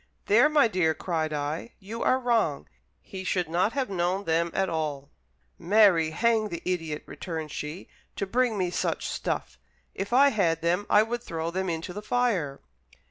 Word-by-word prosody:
"There, 235 +8 +5
my 295 -5 +5
dear," 175 -6 +1
cried 160 -1 -2
I, 150 +8 -3
"you 215 +4 -7
are 255 - +3
wrong; 225 - 0 0.3
he 190 -1 -8
should 180 -2 0
not 180 +7 +1
have 270 -2 -1
known 185 +2 0
them 165 -1 +1
at 190 +2 0
all." 150 -4 -3 0.5
"Marry, 190 -5 +4
hang 220 +5 +1
the 170 -2 -6
idiot," 165 -4 -2
returned 160 -3 -6
she, 150 +6 -6 0.3
"to - - -2
bring 235 +2 +1
me 180 -2 0
such - - -1
stuff; - - -3 0.3
if 200 +2 -5
I 275 +3 +6
had 165 -9 +1
them, 180 +4 +1
I 210 - +6
would 235 +2 -3
throw 165 -6 -4
them 190 +1 -2
into 165 +1 -4
the 205 - -6
fire." 210 - 0
185 Hz, 175 wpm, -27 LUFS, 160-220 Hz, 0.5 s, I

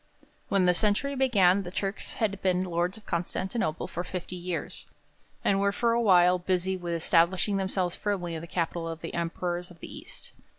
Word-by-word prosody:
When 195 -2 +3
the 180 - +5
century 210 +9 +1
began, 200 -8 +4
the 180 - -6
Turks 195 +2 -3
had 200 -3 -1
been 185 -1 +2
lords 175 +2 -1
of 215 - -15
Constantinople 175 0 -2
for 175 - -4
fifty 180 0 -5
years, 180 0 -4 0.6
and 195 - +3
were 200 0 +3
for 230 +3 +1
a 235 +1 +2
while 180 -4 +5
busy 185 +1 0
with 175 -2 -3
establishing 175 +4 +3
themselves 190 -2 -1
firmly 185 -5 -2
in 160 - -4
the 170 - -8
capital 170 -1 -2
of 165 0 -5
the 165 - -6
Emperors 175 +1 -2
of 175 -2 -15
the - - -9
East. - - -10
180 Hz, 185 wpm, -28 LUFS, 175-200 Hz, 0.6 s, the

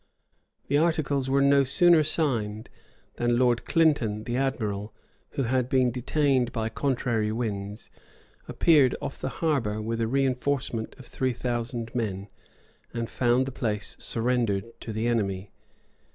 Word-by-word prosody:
The 145 +1 +3
articles 145 -5 +1
were 140 +1 +3
no 140 0 +5
sooner 160 +4 +5
signed, 115 -9 -1 0.5
than 120 0 +1
Lord 120 -1 +2
Clinton, 130 -10 +2
the 120 +1 -3
admiral, 110 -6 -2 0.4
who 135 - -1
had 125 +1 0
been 130 -2 +3
detained 130 0 +1
by 110 -1 -2
contrary 120 -4 0
winds, 105 -2 -4 0.6
appeared 145 -6 +4
off - - -6
the - - -3
harbor 125 -7 -1
with 115 +1 -2
a - - +2
reënforcement 130 -2 -1
of 130 - -12
three 130 0 -1
thousand 120 -1 -3
men; 100 -4 -3 0.6
and 115 -1 -4
found 125 +1 +2
the 135 - -5
place 105 -5 -3
surrendered 115 -4 0
to 115 - -6
the 110 +1 -2
enemy. 100 -5 -1
120 Hz, 140 wpm, -27 LUFS, 110-135 Hz, 0.6 s, no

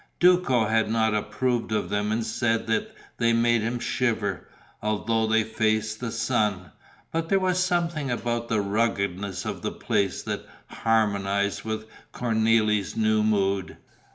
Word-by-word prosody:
Duco 175 -10 +4
had 110 0 +1
not 110 -1 +2
approved 115 +3 -1
of 105 -2 -1
them 105 +1 0
and 110 +1 0
said 115 0 0
that 110 -1 -1 0.2
they 115 0 +2
made 115 0 +3
him 115 +3 -1
shiver, 110 -6 -1 0.3
although 110 +1 0
they 110 0 +3
faced 110 0 0
the 125 - -3
sun; 105 -7 0 0.4
but 165 0 -2
there 195 - +4
was 185 -1 +1
something 170 -5 0
about 120 -1 -2
the 110 -3 +1
ruggedness 100 -3 -1
of - - -4
the - - -2
place 100 -2 -1
that - - -4 0.2
harmonized 100 -3 0
with 110 0 -4 0.3
Cornélie's 110 -3 +1
new 110 -1 +3
mood. 100 -3 0
110 Hz, 145 wpm, -26 LUFS, 105-120 Hz, 0.4 s, Duco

